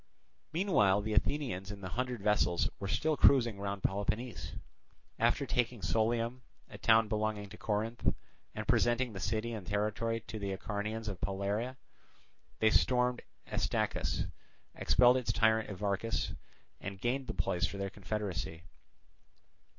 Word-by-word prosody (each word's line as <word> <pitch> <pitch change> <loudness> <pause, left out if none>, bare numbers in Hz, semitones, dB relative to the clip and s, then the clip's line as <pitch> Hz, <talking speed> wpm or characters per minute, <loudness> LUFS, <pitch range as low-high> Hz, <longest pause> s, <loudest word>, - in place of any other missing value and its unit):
Meanwhile 135 - +3
the 110 0 -2
Athenians 105 -4 0
in 100 -1 -7
the 95 - -5
hundred 125 0 -3
vessels 100 -5 +2
were 100 - -3
still 155 +10 +1
cruising 120 -8 +5
round 100 -1 -3
Peloponnese. 105 +5 -2 0.7
After - - +3
taking 120 -2 0
Sollium, 115 +7 +1 0.3
a - - -11
town 110 -1 +5
belonging 105 -1 -1
to 105 - -11
Corinth, 110 +2 0 0.4
and - - -4
presenting 120 0 +2
the 95 - -6
city 110 +4 -1
and 105 -5 -6
territory 110 +2 0
to 110 0 -7
the 100 -1 -2
Acarnanians 105 +2 -3
of 100 -3 -4
Palaira, 100 +6 -2 0.8
they 110 0 +4
stormed 125 -1 +3 0.2
Astacus, - - -1 0.5
expelled 125 0 +5
its 125 - 0
tyrant 110 -1 +3
Evarchus, 100 +3 -1 0.5
and 95 0 -6
gained 130 +4 -1
the - - -4
place 85 -3 +1
for 100 - -7
their 100 -1 -3
confederacy. 90 - -4
110 Hz, 135 wpm, -33 LUFS, 100-120 Hz, 0.8 s, cruising